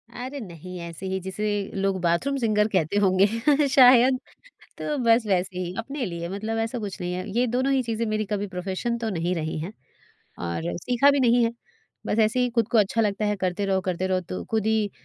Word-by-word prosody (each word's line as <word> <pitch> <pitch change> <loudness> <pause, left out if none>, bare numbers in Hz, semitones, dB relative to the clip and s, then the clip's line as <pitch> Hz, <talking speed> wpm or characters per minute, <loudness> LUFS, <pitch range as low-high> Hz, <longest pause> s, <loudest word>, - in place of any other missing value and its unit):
अरे 260 +3 -6
नहीं! 180 - -9
ऐसे 170 +2 -8
ही 190 0 -2
जिसे 190 +3 -3 0.3
लोग 195 -1 0
बाथरूम 175 +12 +1
सिंगर 215 -3 +2
कहते 180 +1 +1
होंगे, 190 -1 +4 0.4
शायद। 255 -1 +6 0.6
तो 300 - -2
बस 235 -2 +4
वैसे 185 -1 0
ही 180 0 -3
अपने 270 +3 -4
लिए, 170 -3 -5
मतलब 215 +3 -3
ऐसा 230 +2 -2
कुछ 200 -3 -6
नहीं 180 0 -2
है। 185 +2 -4
ये 250 - +3
दोनों 255 +3 0
ही 265 - +3
चीज़ें 230 -1 -2
मेरी 215 0 -1
कभी 205 0 -2
प्रोफेशन 190 +6 -3
तो 230 -1 -3
नहीं 175 -1 -1
रही 155 -1 -3
हैं, 180 +7 -6 0.7
और 85 0 -3
सीखा 250 +3 +3
भी 280 -1 +2
नहीं 240 -1 +4
है। 230 - +1 0.6
बस 220 - -1
ऐसे 220 +4 +2
ही 250 - +1
खुद 230 -2 +1
को 235 - +3
अच्छा 210 +2 +2
लगता 210 -1 0
है, 210 - 0
करते 185 +1 -1
रहो, 190 -1 +1
करते 185 0 -2
रहो, 185 -1 +1
तो 185 +1 -6
खुद 220 -2 0
ही 220 -2 +1
210 Hz, 210 wpm, -25 LUFS, 185-235 Hz, 0.7 s, शायद